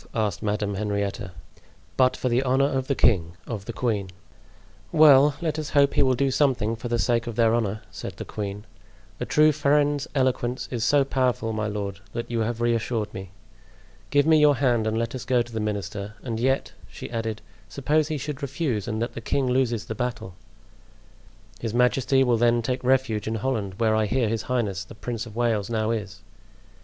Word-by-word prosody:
asked 105 -5 -1
Madame 105 -1 -1
Henrietta. 100 -1 -2 0.6
"But 130 -1 +3
for - - -2
the 120 +1 +2
honor 135 +1 +2
of 130 -2 -1
the 140 - +1
king—of 100 +1 0
the 115 - -4
queen." 110 -6 -1 0.8
"Well, 145 -2 +6
let 155 -2 -1
us 150 -2 -4
hope 140 -1 +3
he 145 - +3
will 130 -2 +3
do 135 +2 +1
something 125 -6 +1
for 120 +2 -6
the 120 0 0
sake 115 +2 +1
of 115 - -4
their 115 -1 +3
honor," 110 -2 -1
said - - -7
the - - -6
queen. 105 0 -5 0.5
"A - - -3
true 155 0 +5
friend's 145 -1 +1
eloquence 130 -2 0
is 120 -3 -2
so 140 +3 +4
powerful, 125 -4 0
my 105 -1 -1
lord, 100 -2 -4
that 120 0 -5
you 115 - 0
have 115 +1 -2
reassured 115 -2 0
me. 95 -1 -7 0.8
Give 145 0 +3
me 160 -1 +5
your 150 -1 +5
hand 120 -4 +1
and 110 0 0
let 115 0 -2
us 130 - -5
go 125 -2 +2
to 120 - -14
the 110 - -2
minister; 100 0 -4
and 115 -3 -3
yet," 135 +3 0 0.2
she - - -9
added, 115 -2 -3 0.3
"suppose 150 +2 +1
he 155 -1 -2
should 145 +1 -5
refuse 135 - -2
and 110 -2 -2
that 120 - -4
the 115 - -6
king 140 +4 0
loses 125 -3 0
the - - -4
battle?" 115 -5 -4 1.3
"His 115 -1 -4
majesty 130 +2 +3
will 120 -2 +2
then 120 0 +3
take 125 +2 -2
refuge 125 -5 +1
in 110 - -1
Holland, 110 -5 -2
where 110 -2 +2
I 110 -1 +1
hear 125 +2 +1
his 115 0 -1
highness 105 -7 -1
the 95 - -13
Prince 120 0 -5
of 110 - -12
Wales 115 -4 0
now 110 -1 0
is." 105 -4 -4
120 Hz, 195 wpm, -25 LUFS, 110-130 Hz, 1.3 s, Well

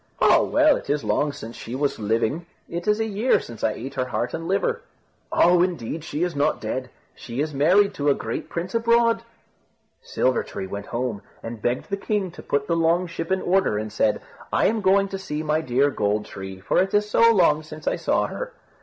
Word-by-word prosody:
"Oh! - - +5
well, 305 0 +4
it - - -10
is 145 -1 0
long 110 +8 +1
since 115 -4 -9
she 120 - -7
was 140 -1 -1
living. 115 +10 0 0.2
It 170 +3 -5
is 210 +1 +3
a 225 - +1
year 220 +4 +2
since 115 -2 -10
I 110 - +2
ate 135 +6 -7
her 130 -2 -1
heart 125 -1 -2
and 165 0 -4
liver." 465 - 0 0.5
"Oh! 175 0 +5
indeed 165 -4 -2
she 160 +1 -2
is 175 -3 -2
not 145 +2 +1
dead. 125 +3 -4 0.2
She 120 +1 -7
is 150 +1 -1
married 185 +8 +4
to 145 -5 0
a 140 - +4
great - - -5
prince 175 +2 -4
abroad." 230 0 +3 0.8
Silver 130 -1 +1
tree - - -6
went 100 +1 -6
home, 120 -4 -3 0.2
and 115 -1 -7
begged 120 - -2
the 200 - 0
king 200 -2 -1
to - - -11
put 140 0 -1
the 170 - 0
long 165 +2 +2
ship 170 0 -5
in 190 - +1
order, 185 - +2
and 105 0 -4
said, 105 0 +1 0.3
"I - - +2
am 220 0 +2
going 195 +1 +4
to 195 - -5
see 155 -5 -4
my 155 +1 +1
dear 140 0 +2
Gold 105 -2 0
tree, 95 -1 -8
for 95 - +1
it 190 +2 0
is 210 0 +2
so 230 +2 +5
long 165 -7 +4
since 155 0 -11
I - - +1
saw - - +1
her." - - -6
155 Hz, 220 wpm, -24 LUFS, 125-195 Hz, 0.8 s, Oh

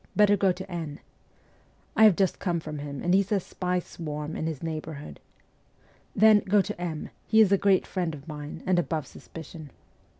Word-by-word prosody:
Better 205 -1 +5
go 195 -1 +3
to 190 +1 -6
N 160 -4 -5 0.3
.' - - -34
' - - -36
I 220 - +7
have 210 -5 +7
just 190 0 +1
come 175 -3 -1
from 155 -2 -6
him, 140 -1 -6
and 175 - +2
he 195 - +6
says 200 -1 -1
spies 180 -1 -2
swarm 150 -1 -6
in 160 - -2
his 160 -1 -5
neighbourhood. 155 -2 -6 0.5
' - - -34
Then, 215 -1 +7
go 205 +1 +2
to 200 -2 -2
M; 160 -4 -4 0.2
he 220 - +4
is 210 -3 +6
a - - +7
great 195 -2 +3
friend 175 -4 -2
of 145 +1 -13
mine, 150 -1 -7
and 185 -1 +3
above 160 -3 -2
suspicion. 160 -1 -11
175 Hz, 205 wpm, -27 LUFS, 155-195 Hz, 0.5 s, I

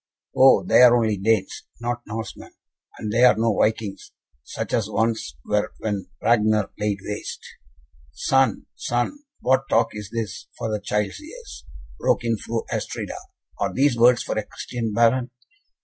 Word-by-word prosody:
"Oh! 130 0 +6
they - - +5
are 120 -1 +8
only 110 -3 +1
Danes, 100 0 0
not 120 0 -3
Norsemen, 110 +1 -7 0.5
and 105 -1 -4
there 120 +2 +6
are 125 - +4
no 115 -1 +1
Vikings, 110 -2 -1 0.3
such - - -6
as 110 -2 +1
once 110 - -1
were 105 0 0
when 100 -4 -3
Ragnar 110 -2 +3
laid 105 -1 0
waste 105 - -6 0.4
" 65 - -51 0.2
"Son, 130 - +1
son, 120 - -2 0.2
what 130 +1 +2
talk 115 - +3
is 105 -2 -7
this 115 -4 -5
for 110 - -3
the 105 -1 -2
child's 105 - -2
ears?" 465 +10 -11 0.3
broke - - +1
in 115 -1 +1
Fru 115 +2 -4
Astrida, - - -4 0.4
"are - - 0
these 140 -1 +2
words 120 +1 +5
for - - -3
a - - -3
Christian 115 +1 -5
Baron?" 120 +3 +3
115 Hz, 160 wpm, -23 LUFS, 105-120 Hz, 0.5 s, are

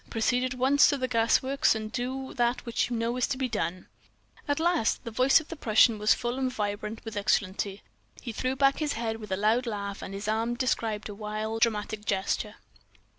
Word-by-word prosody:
Proceed 245 +2 +1
at 255 0 -2
once 270 +3 +5
to 285 - +1
the 255 -1 -1
gas 230 -1 +2
works 275 0 +2
and 215 0 -5
do 260 +2 -4
that 240 +1 0
which 235 0 -1
you 245 - -2
know 230 +2 -1
is 250 - +1
to 275 - -2
be 260 -1 0
done.'"_ 185 -5 -3 0.6
"At 285 +1 0
last!" 335 -8 +1
The 230 - -6
voice 255 +6 +5
of 315 - -12
the 330 - -5
Prussian 225 -4 +4
was 210 +1 +4
full 240 +1 -3
and 260 -1 0
vibrant 210 -1 -4
with 225 -1 -6
exultancy. 200 0 0 0.4
He 240 - -6
threw 255 +4 -2
back 275 0 +3
his 305 -2 0
head 225 -1 -2
with 210 -3 -10
a 190 - 0
loud 225 +5 +2
laugh, 200 -2 -4
and 195 - -6
his 200 +1 -5
arm 225 +2 0
described 225 -4 -1
a 210 - -7
wild, 215 +2 -4
dramatic 215 -2 0
gesture. 195 -1 -1
230 Hz, 215 wpm, -28 LUFS, 210-255 Hz, 0.6 s, once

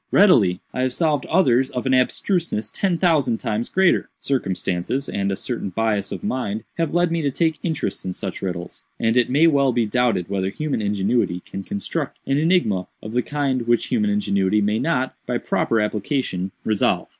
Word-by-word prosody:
"Readily; 110 - +5
I 130 - -2
have 130 -1 0
solved 155 -5 +1
others 135 -7 +3
of 125 - -4
an 130 - +2
abstruseness 130 - 0
ten 185 -4 0
thousand 155 -10 +2
times 115 -1 -2
greater. 190 -1 +2
Circumstances, 95 0 -2
and 100 0 -1
a - - 0
certain 115 -1 -4
bias 105 +1 -1
of - - -5
mind, 120 - -2 0.2
have 165 -3 +1
led 175 -1 +3
me 170 0 0
to 145 - +1
take 160 +3 0
interest 160 - -2
in 90 - -3
such - - -5
riddles, 90 -2 -5 0.2
and 115 +1 +1
it 125 -1 +3
may 145 +6 +4
well 140 -4 +4
be 120 -2 +1
doubted 110 -5 +1
whether 95 -1 -1
human 145 +3 -2
ingenuity 100 -2 0
can 95 - -6
construct 100 0 -4
an 135 +1 +1
enigma 155 - +2 0.2
of 110 - -7
the 125 - +2
kind 135 -4 -1
which 120 0 +2
human 215 -3 +1
ingenuity 105 - +1
may 105 +1 +1
not, 130 -5 0
by - - 0
proper 115 - 0
application, 105 -2 -1 0.2
resolve. 110 -2 +1
125 Hz, 185 wpm, -22 LUFS, 100-150 Hz, 0.2 s, Readily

